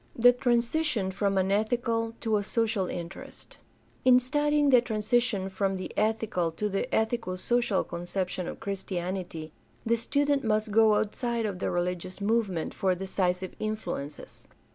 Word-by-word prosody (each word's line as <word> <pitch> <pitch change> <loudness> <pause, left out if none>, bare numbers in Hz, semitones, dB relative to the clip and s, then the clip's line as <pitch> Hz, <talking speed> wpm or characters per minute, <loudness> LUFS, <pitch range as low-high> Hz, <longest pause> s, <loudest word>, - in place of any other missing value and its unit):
The 245 +1 +6
transition 245 -2 +1
from 195 0 0
an 190 0 +2
ethical 230 +2 0
to 220 -2 +1
a 205 - -1
social 215 -3 0
interest. 170 0 -8 0.2
— - - -34
In 250 -1 +7
studying 295 +2 +2
the 250 -2 +7
transition 220 -3 0
from 195 0 -1
the 185 - -5
ethical 215 -5 0
to 210 +5 -2
the 195 0 -1
ethico 220 -4 0
social 240 0 +1
conception 180 +1 -3
of - - -6
Christianity 180 -4 -4 0.3
the 230 +1 +3
student 280 +4 +1
must 215 -1 +1
go 220 0 +5
outside 230 +2 -1
of 195 -4 -3
the - - -1
religious 180 +1 -2
movement 200 -5 0
for 190 -3 +1
decisive 185 0 -1
influences. 175 -9 -5
210 Hz, 145 wpm, -28 LUFS, 185-235 Hz, 0.3 s, In